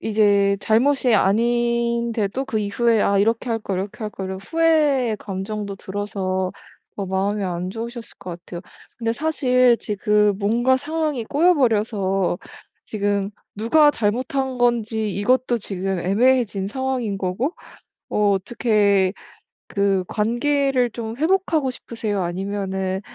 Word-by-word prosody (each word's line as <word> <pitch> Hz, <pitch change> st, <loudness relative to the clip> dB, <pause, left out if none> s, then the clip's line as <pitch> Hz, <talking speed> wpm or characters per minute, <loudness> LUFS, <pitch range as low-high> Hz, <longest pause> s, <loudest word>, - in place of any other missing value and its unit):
이제 200 Hz, -2 st, +3 dB
잘못이 245 Hz, +3 st, +3 dB
아닌데도 235 Hz, +2 st, +1 dB
그 225 Hz, -4 st, -2 dB
이후에 220 Hz, +2 st, +1 dB
'아 200 Hz, -, +2 dB
이렇게 225 Hz, +4 st, +1 dB
할걸. 215 Hz, -5 st, -2 dB
이렇게 205 Hz, +3 st, -5 dB
할걸.' 195 Hz, -2 st, -5 dB
이런 190 Hz, 0 st, -5 dB
후회의 295 Hz, -4 st, +2 dB
감정도 200 Hz, +1 st, -5 dB
들어서 190 Hz, -2 st, -3 dB, 0.4 s
어 200 Hz, -2 st, -3 dB
마음이 195 Hz, +2 st, -1 dB
안 180 Hz, 0 st, -3 dB
좋으셨을 230 Hz, +1 st, -7 dB
것 175 Hz, -2 st, -7 dB
같아요. 175 Hz, -, -7 dB, 0.4 s
근데 230 Hz, -1 st, 0 dB
사실 255 Hz, -4 st, +3 dB
지금 210 Hz, -1 st, +1 dB
뭔가 235 Hz, +5 st, +2 dB
상황이 305 Hz, -3 st, -2 dB
꼬여 340 Hz, +9 st, +3 dB
버려서 205 Hz, -, +1 dB, 0.5 s
지금 205 Hz, -1 st, -1 dB, 0.3 s
누가 295 Hz, +8 st, +4 dB
잘못한 255 Hz, +3 st, -1 dB
건지 225 Hz, -3 st, +1 dB
이것도 245 Hz, +5 st, +1 dB
지금 195 Hz, -3 st, -3 dB
애매해진 205 Hz, +1 st, +2 dB
상황인 255 Hz, -4 st, -2 dB
거고 195 Hz, -, -2 dB, 0.6 s
어 210 Hz, -1 st, +2 dB
어떻게 200 Hz, -2 st, +2 dB, 0.5 s
그 195 Hz, -2 st, +1 dB
관계를 250 Hz, +4 st, +1 dB
좀 225 Hz, 0 st, -6 dB
회복하고 320 Hz, -3 st, +1 dB
싶으세요? 215 Hz, -6 st, -4 dB
아니면은 190 Hz, +1 st, -2 dB
220 Hz, 280 characters per minute, -22 LUFS, 200-245 Hz, 0.6 s, 누가